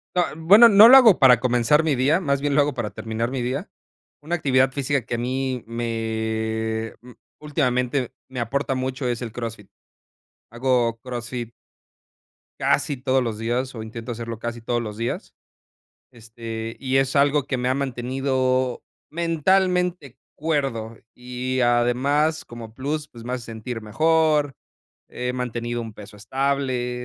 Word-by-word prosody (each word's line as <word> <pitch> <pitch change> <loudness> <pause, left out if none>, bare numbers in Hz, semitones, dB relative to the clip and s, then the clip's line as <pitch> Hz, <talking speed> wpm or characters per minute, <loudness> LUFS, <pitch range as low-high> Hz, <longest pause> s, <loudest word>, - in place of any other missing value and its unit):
No, 180 - +4
bueno, 205 +9 +7
no 210 +1 +9
lo 255 - +10
hago 235 -8 +7
para 125 -4 +6
comenzar 125 +5 +3
mi 155 -3 +1
día, 140 +8 +2
más 140 -5 0
bien 145 0 -1
lo 145 - +5
hago 145 0 0
para 120 -5 -4
terminar 115 +3 -3
mi 130 -2 -2
día. 125 +3 -3 0.5
Una 160 +4 -3
actividad 130 -5 +2
física 140 +1 -1
que 120 - -3
a - - -2
mí 130 0 -2
me, 110 -1 -3
mm, 125 +1 -14 0.3
últimamente 130 -3 -1 0.2
me 130 -1 -5
aporta 135 +3 -1
mucho 130 0 -3
es 120 0 -2
el 115 -3 -5
CrossFit. 115 -4 -7 0.8
Hago 120 -1 0
CrossFit 120 -1 -5 1.1
casi 145 - +1
todos 130 0 +1
los 115 -3 -3
días, 120 +4 -2
o 110 - -6
intento 115 +2 -6
hacerlo 115 -1 -6
casi 120 0 -5
todos 120 +1 -1
los 105 -2 -6
días, 115 - -4 0.8
este, 115 -1 -7
y 135 0 0
es 135 +1 0
algo 145 0 +3
que 135 - -1
me 125 0 -1
ha - - +2
mantenido 130 -1 -1 0.3
mentalmente 170 -3 0 0.2
cuerdo 135 -8 -2 0.2
y 125 +1 -4
además, 125 +6 +2
como 115 -2 -10
plus, 150 +4 -3
pues, 115 -1 -13
me 125 - -4
hace 125 -2 -4
sentir 115 +1 -6
mejor, 150 +5 +2 0.5
he 125 0 -4
mantenido 120 -1 -3
un 115 -2 -7
peso 105 0 -12
estable, 130 0 -2
125 Hz, 155 wpm, -23 LUFS, 115-140 Hz, 1.1 s, lo